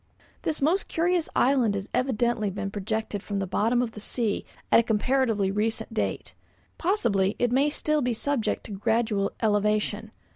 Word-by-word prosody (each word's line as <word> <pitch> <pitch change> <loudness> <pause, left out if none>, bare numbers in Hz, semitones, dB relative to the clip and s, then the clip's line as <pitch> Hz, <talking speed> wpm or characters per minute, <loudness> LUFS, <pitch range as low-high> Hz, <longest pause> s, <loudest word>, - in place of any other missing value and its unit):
This 310 -3 -2
most 350 +7 +2
curious 345 0 +1
island 245 -6 +3
has 195 0 -4
evidently 240 -4 +1
been 195 +1 -4
projected 210 0 -3
from 205 0 -4
the 195 - -1
bottom 230 +6 +1
of 235 - -3
the 215 - -9
sea 215 0 -2 0.3
at - - +8
a - - +3
comparatively 225 -3 +1
recent 220 +2 -1
date. 220 - -2 0.5
Possibly, 215 - +1
it 245 -1 +1
may 275 +4 +3
still 305 0 0
be 250 -2 0
subject 265 +1 -1
to - - -9
gradual 210 0 0
elevation. 210 0 +1
225 Hz, 160 wpm, -26 LUFS, 205-260 Hz, 0.5 s, at